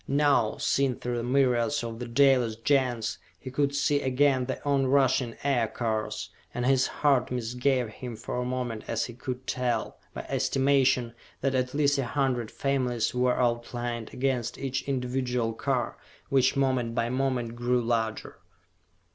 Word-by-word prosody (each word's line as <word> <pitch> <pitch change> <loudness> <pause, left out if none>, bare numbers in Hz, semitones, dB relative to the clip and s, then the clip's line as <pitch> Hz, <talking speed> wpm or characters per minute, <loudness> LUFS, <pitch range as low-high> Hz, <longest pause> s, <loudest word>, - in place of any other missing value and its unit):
Now, 145 0 +2
seen 135 -2 +1
through 120 0 -3
the 115 - -2
myriads 125 0 +2
of 115 -1 -5
the 125 - -5
Dalis 125 -2 +3
Gens, 120 -1 0 0.2
he 130 - -8
could 140 +1 0
see 145 0 +2
again 130 0 +2
the 130 0 -4
on 140 -2 +2
rushing 130 -3 +2
Aircars, 115 -4 -1 0.2
and 120 0 -1
his 135 0 +3
heart 140 -4 +2
misgave 125 +1 0
him 120 +2 -7
for 110 +2 -5
a 125 - 0
moment 125 -3 -3
as 115 - -1
he 120 - -8
could 130 +1 -6
tell, 120 -4 -2 0.2
by - - -5
estimation, 130 -2 +2 0.3
that 135 - +1
at 130 0 -1
least 145 -1 +2
a 135 - 0
hundred 125 -3 0
families 125 -4 -1
were 125 0 +1
outlined 120 -1 -1
against 125 -3 -1
each 135 0 -2
individual 125 -3 -1
car, 125 0 -2 0.3
which 130 -1 +3
moment 130 -4 +1
by 115 -1 0
moment 125 -3 -1
grew 120 +1 +1
larger. 115 -2 -2
125 Hz, 155 wpm, -27 LUFS, 120-135 Hz, 0.3 s, Dalis